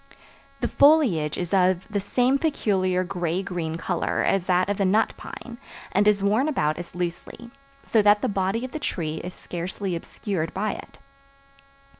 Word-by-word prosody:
The 240 - +1
foliage 250 - +4
is 175 +1 -4
of 185 -1 +3
the 210 -2 -1
same 250 +7 +1
peculiar 190 - +1
gray 175 0 -2
green 165 -4 -3
color 175 +1 -1
as 195 -2 +1
that 180 0 +3
of 205 -1 -1
the - - +3
nut 200 +4 +2
pine, 240 -1 -9 0.3
and 205 +2 +3
is 205 -2 +3
worn 215 +8 +2
about 155 - 0
as 175 0 -9
loosely, 180 +7 -5 0.3
so 220 - +3
that 205 0 +4
the - - +2
body 195 +4 -1
of 260 - -8
the 310 - -4
tree 160 - -3
is 180 - -7
scarcely 180 +2 -4
obscured 170 -1 -4
by 210 +2 0
it. - - -10
190 Hz, 170 wpm, -25 LUFS, 175-215 Hz, 0.3 s, foliage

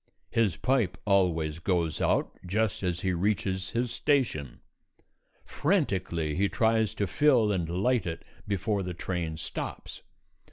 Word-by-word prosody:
His 110 -7 +2
pipe 125 -8 +1
always 80 -6 +2
goes 85 -3 0
out - - +2
just 105 +3 0
as 90 -2 -1
he 95 -1 0
reaches 95 0 0
his 120 0 -1
station; 95 - 0 0.8
frantically 95 - 0
he 100 +2 +2
tries 110 -2 +2
to 100 - 0
fill 120 +1 +3
and 90 -5 -1
light 100 +4 +1
it 80 -1 -5 0.2
before 100 +1 0
the 90 -2 -4
train 85 -3 -3
stops. 80 - -6
95 Hz, 130 wpm, -28 LUFS, 85-110 Hz, 0.8 s, fill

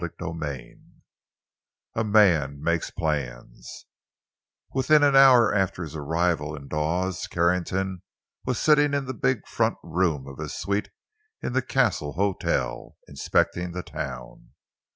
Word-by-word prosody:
CHAPTER 85 -1 -5
VI—A 75 - -9
MAN 85 -10 +3
MAKES 85 0 0
PLANS 60 -6 -5 0.9
Within 145 +3 +4
an 140 -1 +4
hour 130 -5 +7
after 95 -3 0
his 80 -1 -8
arrival 80 0 -1
in 70 -2 -10
Dawes, 85 +5 -2
Carrington 90 +2 0 0.4
was 125 -2 -2
sitting 145 -2 +3
in 140 -1 -1
the 130 - -4
big 130 +1 -1
front 115 0 0
room 80 -5 0
of 70 - -10
his - - -5
suite 100 +1 -2 0.5
in - - -3
the 130 - +2
Castle 120 - 0
Hotel, 100 +2 -2
inspecting 85 +5 -1
the 90 0 -5
town. - - -8
90 Hz, 125 wpm, -25 LUFS, 75-115 Hz, 0.9 s, hour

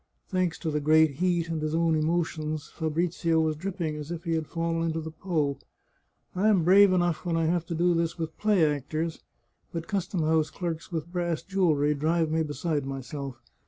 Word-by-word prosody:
Thanks 185 -4 0
to 160 - -3
the 150 - 0
great 155 -1 +4
heat 175 -1 +1
and 160 -2 -2
his 155 +1 -1
own 165 0 +2
emotions, 155 -1 -1
Fa 160 -2 -3
brizio 165 0 +1
was 160 -1 +1
dripping 170 -2 -3
as 150 0 -7
if 170 -1 -5
he 165 - -1
had 160 -2 -1
fallen 165 0 -1
into 165 0 -1
the 160 0 -6
Po. 155 -4 -1 0.4
" - - -46
I 195 +4 +2
am 200 -6 +4
brave 195 +3 +7
enough 175 -3 +1
when 170 -2 0
I 165 - +1
have 170 0 0
to 170 - -3
do 175 +2 +3
with 165 -1 -2
play 210 -6 +4
actors, 155 +3 -2 0.5
but 165 -1 -5
custom 195 -3 -1
house 155 0 +2
clerks 170 0 -5
with 165 0 -4
brass 175 -3 -1
jewellery 160 -7 +2
drive 160 +2 +1
me 160 0 +2
beside 150 -1 -1
myself. 135 -1 -6
165 Hz, 195 wpm, -27 LUFS, 155-175 Hz, 0.5 s, brave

